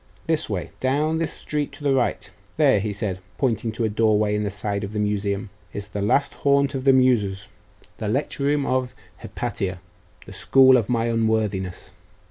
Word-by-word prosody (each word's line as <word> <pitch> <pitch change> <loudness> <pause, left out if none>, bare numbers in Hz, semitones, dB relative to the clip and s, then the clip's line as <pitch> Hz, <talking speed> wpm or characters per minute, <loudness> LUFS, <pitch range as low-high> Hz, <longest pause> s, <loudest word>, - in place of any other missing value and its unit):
This - - 0
way; - - -3
down 150 +5 +1
this 165 - -1
street 150 -1 -3
to 150 - -9
the 140 -1 +2
right. 130 -2 0 0.3
There,' 100 - +4
said 100 -2 -3
he, - - -21 0.2
pointing 115 -4 0
to 115 - -3
a 110 - +1
doorway 105 -1 +2
in 105 - 0
the 100 - -1
side 100 +1 -3
of 100 +1 -5
the 105 - -2
Museum, 105 0 -1 0.2
'is 100 0 -6
the 100 0 -4
last 140 +8 +2
haunt 140 0 +3
of 130 -1 -4
the 135 - +7
Muses 115 -7 +2 0.5
the 110 - -3
lecture 140 +4 -1
room 145 0 +1
of 130 -1 -1 0.2
Hypatia, 95 -2 -4 0.5
the - - -11
school 130 -1 +5
of 115 -3 +1
my 115 -2 +1
unworthiness. 110 -5 -1
110 Hz, 185 wpm, -23 LUFS, 100-135 Hz, 0.5 s, the